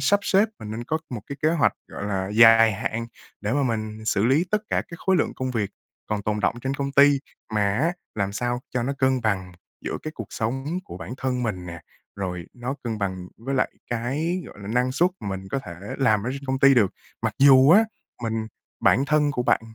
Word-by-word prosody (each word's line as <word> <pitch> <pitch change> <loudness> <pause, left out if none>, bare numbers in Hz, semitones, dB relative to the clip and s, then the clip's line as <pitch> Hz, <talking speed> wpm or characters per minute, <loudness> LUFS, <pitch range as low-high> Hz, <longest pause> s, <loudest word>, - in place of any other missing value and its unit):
sắp 205 0 +3
xếp, 200 +3 +3
mình 105 - -7
nên 115 +2 -5
có 160 +4 -1
1 120 -4 -4
cái 140 - -6
kế 155 - +4
hoạch, 165 -4 +3 0.2
gọi 100 - -6
là, 95 -2 -2
dài 115 0 +7
hạn 115 +3 -3 0.3
để 105 +2 -2
mà 145 +1 +2
mình 110 -3 -2
xử 105 0 +1
lý 140 +8 +3
tất 210 - +3
cả - - +1
cái 170 - -8
khối 190 -1 +4
lượng - - 0
công 130 0 -2
việc 110 -5 -1 0.4
còn 105 -1 -1
tồn 105 0 -1
đọng - - +1
trên 135 +2 -2
công 140 0 -3
ty, 140 0 +6 0.4
mà 105 - +2 0.2
á 165 +5 +2 0.2
làm 100 -1 -1
sao 120 +3 -1
cho 125 - +1
nó 135 +3 -1
cân 130 -1 +2
bằng 95 -4 -1 0.3
giữa - - -2
cái 155 - -4
cuộc 115 - -6
sống 135 +10 -2
của - - -9
bản 125 - -6
thân 125 -1 -1
mình 95 -6 -3
nè, 85 -2 -7 0.4
rồi 90 -3 -4
nó 125 +3 -4
cân 110 -2 -2
bằng 95 -2 -3
với 135 +5 -3
lại 130 - +1 0.2
cái, 150 +10 -1
gọi - - -13
là, 100 - -7
năng 125 +2 +1
suất 175 +6 +3
mà 100 - -5
mình 95 0 -5
có 135 - 0
thể 90 -9 -8 0.2
làm 110 -6 +3
ở 125 - -1
trên 140 0 -6
công 130 0 0
ty 140 0 +6
được. 105 -6 +4 0.3
Mặc - - -1
dù 135 +1 +7
á, 215 +5 +7 0.4
mình 110 -1 -2 0.3
bản 135 - +4
thân 150 -1 +3
của 125 - -1
bạn - - +3
120 Hz, 235 wpm, -24 LUFS, 105-140 Hz, 0.4 s, dài